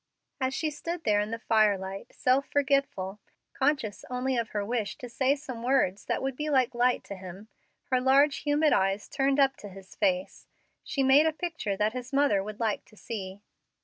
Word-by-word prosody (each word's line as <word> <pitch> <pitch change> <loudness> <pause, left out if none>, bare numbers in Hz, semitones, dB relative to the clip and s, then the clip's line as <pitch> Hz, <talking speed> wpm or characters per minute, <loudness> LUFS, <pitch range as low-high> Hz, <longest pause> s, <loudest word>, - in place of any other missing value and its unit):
As 260 0 -1
she 315 -2 -1
stood 335 +3 -5
there 210 -6 +3
in 210 +1 -1
the 230 - -3
firelight, 200 -4 +1
self 260 +2 +1
forgetful, 275 -9 0 0.3
conscious 270 -7 0
only 255 +1 -1
of 235 -2 -1
her 205 -1 -2
wish 225 -2 -2
to 250 - -8
say 260 +3 +1
some 270 -5 -8
words 240 -6 +1
that - - -1
would 270 -1 -2
be 300 +3 -3
like 260 -4 +2
light 245 +1 +2
to 200 - -7
him, 190 +3 -10 0.4
her 255 -1 +3
large, 275 +3 +4
humid 295 +1 +2
eyes 195 +1 +1
turned 275 0 +1
up 275 -1 +4
to 205 - -9
his 190 0 -13
face, 275 -2 -1 0.4
she 275 -3 -1
made 275 +4 +6
a - - +2
picture 315 - -3
that 210 +2 +1
his 255 +1 -6
mother 275 -8 +3
would 210 +1 -7
like 220 -3 -1
to 215 - -21
see. 200 -4 -6
250 Hz, 195 wpm, -28 LUFS, 210-275 Hz, 0.4 s, made